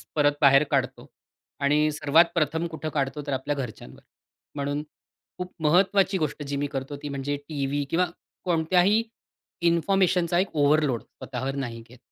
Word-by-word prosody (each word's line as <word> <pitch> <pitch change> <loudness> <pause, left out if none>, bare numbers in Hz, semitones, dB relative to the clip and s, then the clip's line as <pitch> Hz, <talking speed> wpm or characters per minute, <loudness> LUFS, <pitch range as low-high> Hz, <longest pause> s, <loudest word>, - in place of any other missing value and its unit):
परत 145 -1 +4
बाहेर 140 0 +7
काढतो - - -1 0.5
आणि 150 +2 +2
सर्वात 150 +3 +4
प्रथम 160 +1 0
कुठं 160 -1 -5
काढतो, 140 0 -2
तर 140 - -1
आपल्या 140 +3 -2
घरच्यांवर. 115 - -7 0.6
म्हणून 145 +1 -2 0.5
खूप 180 0 -5
महत्वाची 190 +4 +3
गोष्ट 155 -2 -2
जी 140 0 -4
मी 145 +1 -1
करतो 135 +1 -4
ती 145 - -4
म्हणजे 140 +1 -3
टीव्ही 145 -1 -1
किंवा 180 +2 +2 0.4
कोणत्याही 180 +5 +3 0.7
इन्फॉर्मेशनचा 175 0 +2
एक 185 -3 -2
ओव्हरलोड 145 -4 +3
स्वतःवर 130 +1 -6
नाही 120 -4 -4
घेत. 125 - -15
150 Hz, 145 wpm, -26 LUFS, 140-170 Hz, 0.7 s, बाहेर